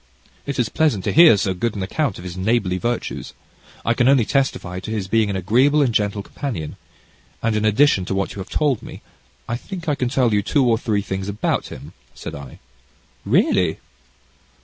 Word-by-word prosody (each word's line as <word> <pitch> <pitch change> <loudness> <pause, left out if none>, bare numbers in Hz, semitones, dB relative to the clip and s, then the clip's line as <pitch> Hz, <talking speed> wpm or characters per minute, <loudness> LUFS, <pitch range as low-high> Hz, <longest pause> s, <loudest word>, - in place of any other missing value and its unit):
"It 140 - -3
is 120 -3 +1
pleasant 150 - +1
to - - 0
hear 160 -8 +8
so 95 -1 0
good 115 +4 -2
an 100 - -3
account 130 +3 -1
of 90 - -10
his 90 -1 -7
neighbourly 95 -1 0
virtues. 120 +2 -3 0.5
I 115 - +3
can 120 +1 +2
only 135 -5 +4
testify 105 -10 -1
to 95 - -8
his 105 -4 -3
being 110 +1 +2
an 100 - -2
agreeable 125 - +3
and 125 -4 0
gentle 100 -1 0
companion, 100 - -5 0.7
and 115 -1 +1
in 105 0 0
addition 110 -2 +3
to 95 - -2
what 100 0 -2
you - - -9
have 95 - -7
told 145 -7 +1
me, - - -11 0.4
I 120 - -2
think 175 +5 -8
I 150 - +2
can 130 -3 -1
tell 125 -4 +2
you 105 - +3
two 135 +7 +1
or 115 -2 +2
three 105 -4 -1
things 95 0 -4
about 100 +1 -1
him," - - -10 0.2
said 80 - -7
I. 70 -3 -9 0.7
"Really!" - - +2
110 Hz, 200 wpm, -21 LUFS, 95-130 Hz, 0.7 s, hear